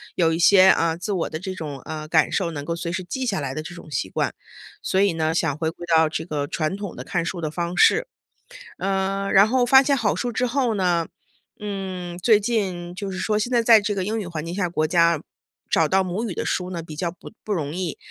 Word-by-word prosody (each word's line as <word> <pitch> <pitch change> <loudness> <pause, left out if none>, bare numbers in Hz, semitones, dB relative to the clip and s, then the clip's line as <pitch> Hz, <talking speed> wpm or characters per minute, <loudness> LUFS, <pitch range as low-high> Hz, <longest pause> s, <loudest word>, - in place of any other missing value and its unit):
有 165 -2 +2
一 165 - -2
些， 190 +1 +7
呃， 165 -3 +3
自 185 +4 -4
我 185 -4 -1
的 155 - -4
这 190 0 -5
种， 150 -6 -6
呃， 155 -1 -6
感 160 0 +3
受， 185 -4 0
能 145 -3 -6
够 170 +2 -2
随 170 0 -4
时 185 +2 -3
记 260 +9 -4
下 205 -8 -1
来 135 -2 -3
的 155 - -4
这 175 +3 -9
种 170 -2 -12
习 95 - -2
惯。 - - -1 0.5
所 190 - 0
以 200 -3 +3
呢， 160 -1 0
想 160 -5 +1
回 160 -1 0
归 175 +1 -9
到 160 -1 +4
这 160 0 -4
个 150 -4 -3
传 155 +4 -2
统 200 -2 -6
的 - - -7
看 175 -3 -1
书 175 +1 -4
的 155 -2 -3
方 175 +2 -3
式。 - - +5 0.7
呃， 195 0 -1
然 195 +1 +7
后 245 +3 +2
发 265 +2 +7
现 280 0 +2
好 225 -4 +1
书 245 -1 -2
之 250 +3 0
后 250 -1 0
呢 175 -4 +1 0.5
嗯， 190 -4 -5
最 210 +3 +4
近 190 -6 -2
就 195 +1 -5
是 185 - -5
说 210 +1 0
现 215 +4 -2
在 240 -2 +3
在 225 -2 +6
这 205 0 -1
个 195 -2 -2
英 220 +3 -2
语 210 - -4
环 165 -2 -5
境 170 +1 -5
下 185 -3 -1
国 155 -2 0
家 170 -2 +3 0.5
找 160 -2 +2
到 190 0 +3
母 205 +6 -3
语 - - -4
的 - - -4
书 180 0 -1
呢 170 -2 -4
比 160 -1 -9
较 170 +2 -2
不 180 - -13
不 215 - -2
容 150 -5 -3
易。 180 -4 -3
180 Hz, 270 characters per minute, -23 LUFS, 165-205 Hz, 0.7 s, 些